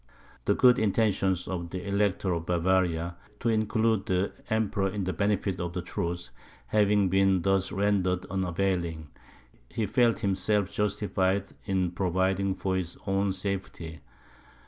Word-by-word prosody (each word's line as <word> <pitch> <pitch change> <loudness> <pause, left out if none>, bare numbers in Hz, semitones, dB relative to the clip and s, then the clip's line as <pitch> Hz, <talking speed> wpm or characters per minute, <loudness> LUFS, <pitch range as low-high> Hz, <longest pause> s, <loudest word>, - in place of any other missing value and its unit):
The - - +3
good 125 -1 +5
intentions 100 -4 +1
of 85 -2 -4
the 90 +2 -6
Elector 100 -2 +1
of 85 0 -4
Bavaria, 85 -1 +1 0.2
to 115 - 0
include 110 -1 +1
the 95 +1 +1 0.2
Emperor 105 -3 +1
in 100 0 -3
the 95 0 -2
benefit 100 +1 0
of 85 -1 -3
the 90 -1 -3
truce, 85 -5 -4 0.3
having 105 -2 +3
been 95 -1 +3
thus 95 0 +1
rendered 95 -2 +1
unavailing, 90 -4 -1 0.6
he 110 - -2
felt 115 -1 +2
himself 100 0 +1
justified 100 -1 0 0.2
in 95 -3 0
providing 95 +1 0
for 95 -1 -1
his 90 -2 -4
own 95 0 +1
safety. 95 -5 -4
95 Hz, 135 wpm, -28 LUFS, 90-100 Hz, 0.6 s, good